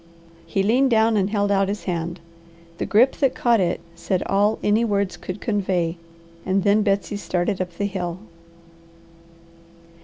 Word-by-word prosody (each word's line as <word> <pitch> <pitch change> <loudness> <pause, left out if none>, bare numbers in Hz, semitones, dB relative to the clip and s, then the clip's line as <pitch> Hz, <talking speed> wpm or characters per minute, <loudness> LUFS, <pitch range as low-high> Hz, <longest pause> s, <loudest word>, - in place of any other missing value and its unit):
He 195 +4 0
leaned 250 +6 +3
down 225 -1 +3
and 195 -1 +1
held 205 -1 0
out 195 -1 +2
his 205 +1 -4
hand. 170 -1 -3 0.6
The - - -2
grip 245 +6 +4
that 270 -3 +1
caught 235 -2 +3
it 180 -2 0
said 170 +2 -2
all 205 +2 +2
any 210 +3 +3
words 200 -4 0
could 185 +2 -7
convey; 185 -6 -1 0.5
and 190 0 0
then 205 +1 +4
Betsy 200 0 0
started 185 +1 -1
up 180 -1 -4
the 200 - -1
hill. 180 -3 -3
200 Hz, 155 wpm, -22 LUFS, 185-215 Hz, 0.6 s, grip